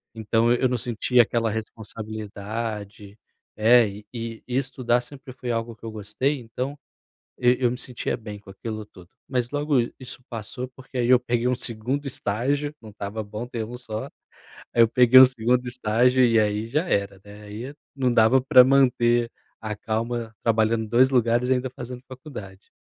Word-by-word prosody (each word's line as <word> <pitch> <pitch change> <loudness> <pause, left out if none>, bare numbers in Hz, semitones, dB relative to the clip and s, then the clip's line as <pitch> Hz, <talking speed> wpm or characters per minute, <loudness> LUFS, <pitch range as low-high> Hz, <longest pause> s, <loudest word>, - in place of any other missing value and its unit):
Então 115 +1 +1
eu 125 +1 +2
não 125 - 0
sentia 120 +1 +2
aquela 115 0 -1
responsabilidade. 110 -1 -6 0.4
É. 115 +2 +6 0.3
E 115 -1 -6
estudar 125 -1 0
sempre 135 +1 -11
foi 125 -1 -4
algo 115 0 -3
que - - -33
eu 115 - -5
gostei, 110 +7 -2
então 125 +4 -5 0.6
e 125 0 +4
eu 125 -2 +3
me 125 - -4
sentia 125 -1 -3
bem 105 -2 -8
com 100 - -17
aquilo 110 +3 -6
tudo. 90 -4 -17 0.2
Mas 125 -2 -1
logo 145 0 0 0.2
isso 125 -1 -10
passou, 120 +2 -6
porque, 130 0 -11
aí, 120 -1 +1
eu 125 -1 +7
peguei 120 0 -1
um 125 - +2
segundo 125 +5 -3
estágio. 140 +5 -1
Não 110 - -11
estava 100 +2 -5
bom 105 +3 -6
ter 120 -2 -4
1 120 +3 -8
só. 110 -3 -5 0.7
Aí, 120 - +4
eu - - +4
peguei 125 +2 +7
o 130 - +11
segundo 125 0 0
estágio. 125 +1 +2
E 115 -1 +4
aí, 105 +1 0
já 150 +9 -1
era, 100 - -1
né? 105 +1 -12
Aí, 110 +7 -7 0.2
não 130 -3 +1
dava 115 +3 +5
pra 130 0 +7
manter 120 -3 +3 0.3
a 110 -1 -4
calma 115 +2 -3
trabalhando 110 0 +2
em - - -10
2 125 +4 +4
lugares 120 -1 +2
e - - +5
ainda 130 0 -1
fazendo 125 0 -8
faculdade. 125 -8 -10
120 Hz, 175 wpm, -24 LUFS, 110-125 Hz, 0.7 s, o